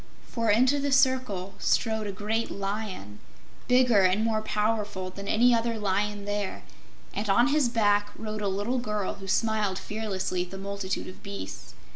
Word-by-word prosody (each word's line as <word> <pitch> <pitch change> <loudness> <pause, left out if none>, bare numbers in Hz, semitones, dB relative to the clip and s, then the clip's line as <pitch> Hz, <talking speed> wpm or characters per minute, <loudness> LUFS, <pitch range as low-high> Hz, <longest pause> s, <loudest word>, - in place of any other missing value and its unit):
For 230 -2 -1
into 255 +7 +4
the 280 0 -1
circle 255 -9 +2
strode 220 -2 +1
a - - -2
great 215 +3 -2
Lion 195 - -5 0.5
bigger 250 -4 +5
and 190 +3 +3
more 220 -1 +1
powerful 210 -3 -1
than 200 +1 -8
any 240 +4 +4
other 230 0 +1
lion 205 0 -1
there 205 -1 -3 0.5
and 205 +1 -3
on 240 +7 +5
his 285 -4 +3
back 205 -3 +2
rode 215 -1 -5
a 205 - 0
little 205 +6 -1
girl 210 -4 -2
who 195 - -9
smiled 210 -1 +1
fearlessly 195 -4 -3
at 180 - -10
the 195 - -7
multitude 195 -1 -4
of 185 - -11
beasts. 195 - -8
210 Hz, 165 wpm, -27 LUFS, 195-230 Hz, 0.5 s, bigger